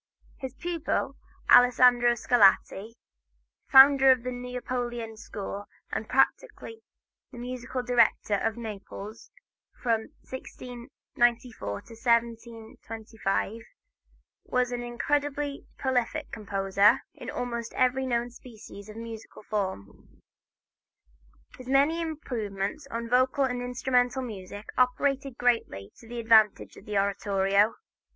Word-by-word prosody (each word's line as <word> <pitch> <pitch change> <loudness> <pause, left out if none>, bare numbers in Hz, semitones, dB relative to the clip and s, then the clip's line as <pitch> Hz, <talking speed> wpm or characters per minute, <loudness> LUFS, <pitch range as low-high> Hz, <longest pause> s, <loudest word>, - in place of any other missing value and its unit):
His 265 -2 -6
pupil, 340 -1 -2 0.4
Alessandro 245 -1 +6
Scarlatti, 215 -1 +3 0.8
founder 270 0 +8
of 255 -2 +2
the 255 - -3
Neapolitan 245 -2 -4
school 205 -1 -7 0.3
and 220 - -4
practically 445 - 0 0.5
the - - -11
musical 250 +1 -5
dictator 235 -4 +2
of 225 -1 -1
Naples, 215 -1 -8 0.5
from 225 -3 0 0.2
1694 240 - -3
to 100 - -1 0.2
1725, 225 -2 -2 0.8
was 250 -1 0
an 245 0 -3
incredibly 285 +3 -2
prolific 265 +3 -1
composer 200 +2 +2
in 300 - -9
almost 235 -1 -4
every 260 +1 +1
known 240 -1 -1
species 215 -4 -12
of 215 - -10
musical 225 -2 -9
form. 190 - -5 1.4
His 255 - -10
many 285 +5 +3
improvements 245 -5 -4
in 230 -1 -4
vocal 255 +3 +2
and 250 -2 -1
instrumental 250 +1 0
music 205 -3 -8
operated 270 +1 +1
greatly 165 - 0
to 230 - -16
the 240 +1 -6
advantage 220 -2 +3
of - - -14
the 210 -1 -1
oratorio. 200 +1 +2
240 Hz, 105 wpm, -27 LUFS, 215-255 Hz, 1.4 s, founder